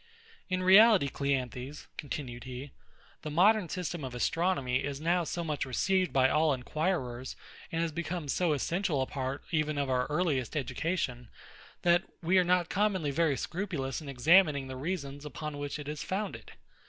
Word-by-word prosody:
In 185 0 0
reality, 195 -4 +7
CLEANTHES, 135 0 -3
continued 130 -4 -6
he, 130 +2 -7 0.5
the 155 - -5
modern 185 +4 +4
system 175 -3 -4
of 130 -2 -5
astronomy 140 -2 0
is 140 -1 -4
now 170 +3 +1
so 170 +1 -3
much 150 -3 -2
received 185 +8 +1
by 130 -1 +4
all 150 +1 +3
inquirers, 130 -2 -2 0.4
and 165 0 0
has 165 - -1
become 170 0 -4
so 165 +3 +1
essential 160 -1 0
a - - -2
part 135 0 -4
even 155 -2 0
of 140 -2 0
our 125 -1 +1
earliest 150 -5 0
education, 130 -3 -2 0.5
that 175 0 +5 0.2
we 180 +3 +4
are - - +4
not 180 -1 +2
commonly 190 -7 0
very 155 -2 +1
scrupulous 165 -8 -3
in 145 - -8
examining 145 +2 +4
the 130 - -6
reasons 145 -1 -4
upon 150 0 -6
which 145 +1 -4
it 145 -1 -8
is 150 0 -4
founded. 200 +2 -4
150 Hz, 165 wpm, -30 LUFS, 135-175 Hz, 0.5 s, reality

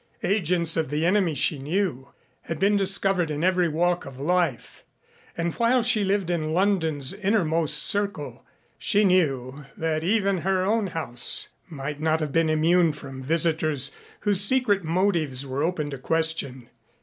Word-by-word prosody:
Agents 180 -4 +1
of 160 -4 -1
the 150 +3 -1
enemy, 180 -3 +1
she 140 +2 0
knew, 150 -2 -3 0.3
had 165 - -4
been 200 +5 +2
discovered 195 -3 +2
in 150 +1 -3
every 180 -2 +2
walk 175 +3 0
of 135 -1 -11
life, 175 +4 -2 0.5
and 170 -1 -2
while 235 +1 +2
she 225 -3 +3
lived 195 -2 0
in 155 -2 -2
London's 165 -8 +1
innermost 170 -7 +1
circle, 200 -8 -2 0.4
she 205 - +2
knew 145 -7 0
that 160 -1 -2
even 195 0 +1
her 185 +1 0
own 210 +1 0
house 125 -9 -1 0.2
might 145 -1 -6
not 160 +1 +1
have 155 -2 -3
been 165 +1 +1
immune 165 +1 +2
from 135 -2 -10
visitors 155 -2 +1 0.3
whose 205 -2 +1
secret 205 -3 +2
motives 160 -6 0
were 135 +1 -4
open 155 -3 -2
to 135 - -7
question. 160 -5 -2
165 Hz, 150 wpm, -24 LUFS, 150-195 Hz, 0.5 s, she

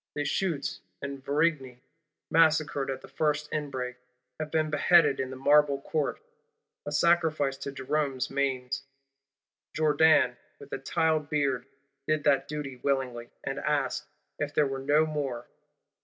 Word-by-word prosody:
Deshuttes 150 0 -1 0.2
and 140 -1 -5
Varigny, 140 -3 0 0.5
massacred 155 -4 +3
at 135 0 -3
the - - -12
first 150 +2 0
inbreak, 130 -4 -3 0.4
have 155 -1 -3
been 155 0 0
beheaded 150 -2 +4
in 130 -1 -2
the 130 - -7
Marble 145 +1 +4
Court: 150 +1 -2 0.7
a - - -2
sacrifice 155 -3 +2
to 140 0 -5
Jerôme's 135 -1 -1
manes: 135 -1 -1 0.9
Jourdan 155 -4 +4 0.2
with - - -13
the - - -3
tile 160 +3 +1
beard 145 -4 -1 0.4
did 155 -1 +1
that 140 -2 +3
duty 145 -3 -5
willingly; 125 -3 -2
and 135 +1 -3
asked, 145 -4 -1 0.3
If 145 0 -3
there 150 - +4
were 135 -1 -3
no 145 +3 +3
more? 140 -6 -3
145 Hz, 135 wpm, -28 LUFS, 135-155 Hz, 0.9 s, beheaded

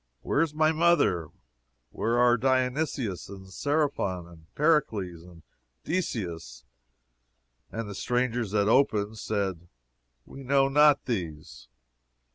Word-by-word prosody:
Where 145 - +1
is 160 -2 -1
my 155 0 +3
mother? 155 - +2 0.6
Where 115 +1 -1
are 120 0 +5
Dionysius 130 - -1
and 95 -1 -10
Serapion, 140 - -1
and 80 -2 -18
Pericles, 110 - +1
and 85 -1 -16 0.4
Decius? 90 - -4 1.1
And 115 -1 -4
the 100 - -6
strangers 120 0 -1
that 100 0 +1
opened 110 -4 +2
said, 95 -5 -3 0.6
We 135 - -11
know 135 +1 +2
not 145 0 +4
these. 80 - -5
115 Hz, 110 wpm, -27 LUFS, 90-140 Hz, 1.1 s, are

